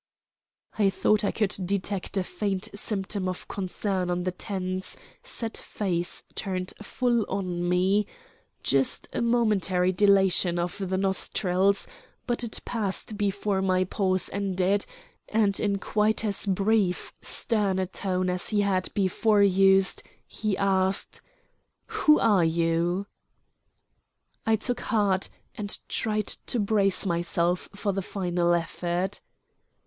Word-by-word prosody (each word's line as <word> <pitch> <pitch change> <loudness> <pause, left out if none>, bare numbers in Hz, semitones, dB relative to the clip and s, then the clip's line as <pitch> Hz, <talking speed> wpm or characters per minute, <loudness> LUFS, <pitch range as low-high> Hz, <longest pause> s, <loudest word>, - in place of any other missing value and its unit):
I 200 -2 +5
thought 210 +2 +2
I 205 - +2
could 210 -4 +1
detect 195 +1 -2
a 190 - +2
faint 195 0 -3
symptom 200 -2 -2
of 185 - -6
concern 190 -1 -2
on 175 0 -1
the 185 - -1
tense, 185 0 -4 0.3
set 230 - -4
face 175 -4 -3
turned 185 -2 -3
full 240 +1 +1
on 180 -3 -2
me 190 +3 +2 0.6
just 135 -1 +1
a - - -1
momentary 210 -6 +2
dilation 190 -2 +3
of 175 +3 -2
the 190 -1 -1
nostrils; 190 0 +1 0.4
but 240 0 -1
it 230 - -3
passed 215 -1 -2
before 200 -1 0
my 185 -1 +2
pause 185 0 0
ended, 195 0 +1 0.4
and 210 -3 +2
in 200 -1 +1
quite 215 +2 +1
as 205 0 -1
brief, 195 -1 +1
stern 205 -5 +1
a 190 - +1
tone 185 0 -2
as 180 0 -1
he 210 -2 +2
had 190 -2 0
before 205 +2 +3
used 195 0 +4 0.2
he 215 -3 -2
asked: 190 -1 +1 0.6
"Who 305 0 +3
are 200 -6 +4
you?" 165 +3 +1 1.4
I 225 - +5
took 245 +3 -2
heart, 200 -4 +1 0.2
and 210 -2 -1
tried 215 -1 -1 0.2
to 245 - 0
brace 200 -2 +2
myself 170 0 0
for 205 -1 -1
the 195 - -1
final 175 -2 0
effort. 175 +2 -2
195 Hz, 125 wpm, -27 LUFS, 185-205 Hz, 1.4 s, I